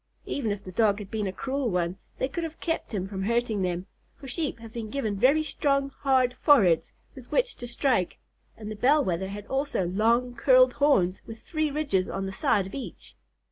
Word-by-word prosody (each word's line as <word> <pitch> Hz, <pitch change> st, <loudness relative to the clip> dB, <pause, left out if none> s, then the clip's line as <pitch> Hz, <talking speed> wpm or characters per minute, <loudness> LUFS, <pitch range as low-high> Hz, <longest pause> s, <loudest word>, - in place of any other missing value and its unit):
Even 255 Hz, -6 st, -2 dB
if 205 Hz, 0 st, -4 dB
the 185 Hz, -, -8 dB
Dog 205 Hz, +1 st, +3 dB
had 205 Hz, -2 st, -9 dB
been 215 Hz, -2 st, -1 dB
a -, -, -2 dB
cruel 265 Hz, +5 st, -2 dB
one, 180 Hz, -2 st, -1 dB, 0.2 s
they 260 Hz, -, 0 dB
could 335 Hz, +5 st, -4 dB
have 325 Hz, 0 st, -6 dB
kept 325 Hz, -1 st, -3 dB
him 190 Hz, -4 st, -2 dB
from 190 Hz, -1 st, -5 dB
hurting 230 Hz, 0 st, 0 dB
them, 180 Hz, 0 st, -2 dB, 0.3 s
for 275 Hz, -, -11 dB
Sheep 300 Hz, -1 st, -2 dB
have 230 Hz, -1 st, -12 dB
been 225 Hz, -2 st, -5 dB
given 220 Hz, -5 st, -2 dB
very 275 Hz, +9 st, +4 dB
strong, 275 Hz, -2 st, 0 dB
hard 260 Hz, -3 st, +3 dB
foreheads 195 Hz, -, +4 dB, 0.2 s
with 260 Hz, -3 st, -13 dB
which -, -, +1 dB
to 245 Hz, -, -7 dB
strike, 235 Hz, -6 st, 0 dB, 0.4 s
and 215 Hz, -1 st, -7 dB
the -, -, -5 dB
Bell 275 Hz, +6 st, +3 dB
Wether 185 Hz, +1 st, -1 dB
had 205 Hz, +1 st, -7 dB
also 270 Hz, -7 st, -1 dB
long, 230 Hz, +7 st, +1 dB
curled 255 Hz, +1 st, +5 dB
horns 200 Hz, -11 st, +2 dB
with 225 Hz, 0 st, -10 dB
three 310 Hz, -2 st, -1 dB
ridges 280 Hz, -11 st, 0 dB
on 195 Hz, 0 st, -3 dB
the 195 Hz, -, -4 dB
side 195 Hz, 0 st, +1 dB
of 190 Hz, -, -10 dB
each. 275 Hz, -, -8 dB
235 Hz, 210 wpm, -27 LUFS, 195-275 Hz, 0.4 s, curled